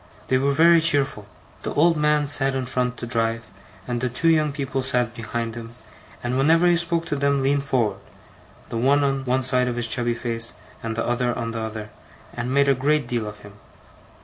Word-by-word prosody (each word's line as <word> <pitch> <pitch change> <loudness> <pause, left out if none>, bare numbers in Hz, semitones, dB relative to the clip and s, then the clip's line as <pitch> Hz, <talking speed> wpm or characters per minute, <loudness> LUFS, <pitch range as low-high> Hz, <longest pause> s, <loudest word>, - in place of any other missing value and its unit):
They 130 - +3
were 140 +1 +1
very 165 +3 +5
cheerful. 140 -10 +2 0.3
The - - -5
old 165 +3 +4
man 150 -1 +2
sat 135 -1 +2
in 130 -1 -2
front 125 -1 -2
to - - -5
drive, 115 -1 -1 0.4
and 120 -1 -2
the 130 - 0
two 125 +7 +1
young 155 -2 +3
people 135 -2 -3
sat 125 -3 +1
behind 115 0 -4
him, 115 0 -9 0.5
and 125 +2 -1
whenever 165 +5 +4
he 175 0 +5
spoke 170 0 -1
to 150 - -2
them 140 -1 +1
leaned 140 +1 +2
forward, 115 -8 0 0.7
the 115 - -4
one 140 +4 +3
on 135 -1 -1
one 130 +1 0
side 125 -1 +3
of 125 - -2
his 120 -1 -1
chubby 120 +1 -1
face 115 -1 -2 0.3
and 115 -1 -4
the 115 - -2
other 120 0 -1
on 115 0 -3
the 115 - -4
other, 110 -1 -6 0.4
and 120 +1 -4
made 140 +1 +3
a 140 - +5
great 145 +3 0
deal 115 -3 -2
of 105 0 -9
him. 105 0 -13
130 Hz, 210 wpm, -23 LUFS, 115-140 Hz, 0.7 s, very